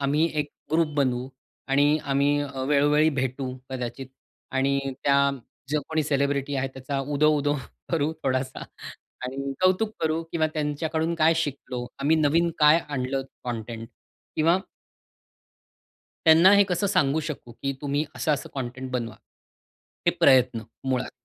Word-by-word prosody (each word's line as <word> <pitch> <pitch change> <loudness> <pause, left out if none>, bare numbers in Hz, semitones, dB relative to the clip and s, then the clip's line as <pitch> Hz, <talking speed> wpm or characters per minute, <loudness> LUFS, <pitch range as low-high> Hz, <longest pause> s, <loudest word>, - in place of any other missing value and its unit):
आम्ही 150 +4 +2
एक 145 - -5 0.2
ग्रुप 165 -1 +3
बनवू 130 -2 0 0.4
आणि 145 +3 +4
आम्ही 140 +1 +2
अ, 135 -2 -5
वेळोवेळी 150 +2 +4
भेटू, 130 0 -3 0.2
कदाचित 130 +1 -5 0.5
आणि 135 +1 +2 0.3
त्या 140 0 +4 0.4
जो 150 0 +1
कोणी 160 -1 +1
सेलिब्रिटी 140 -1 0
आहे 135 0 -1
त्याचा 130 +1 -5
उदो-उदो 145 +1 +2 0.4
करू 160 -1 +1
थोडासा 130 0 -1 0.6
आणि 135 +2 -4
कौतुक 185 +4 +3
करू 160 0 0
किंवा 160 -2 +2
त्यांच्याकडून 160 +2 -1
काय 165 0 +4
शिकतो, 135 -5 -3
आम्ही 155 +3 +3
नवीन 160 +3 +3
काय 150 +1 +7
आणलं 135 -1 -2 0.2
कॉनटेंट 115 -1 -5 0.5
किंवा 165 +4 +4 1.7
त्यांना 165 +4 +8
हे 200 - +6
कसं 185 +1 0
सांगू 155 -6 +2
शकू 130 -5 -7
की 140 +4 -3
तुम्ही 145 +1 0
असं-असं 150 -4 -1
कॉनटेंट 130 0 -5
बनवा. 120 -3 -3 0.9
हे - - +7
प्रयत्न 125 -3 +5 0.3
मुळात, 130 -1 0
140 Hz, 130 wpm, -25 LUFS, 130-155 Hz, 1.7 s, त्यांना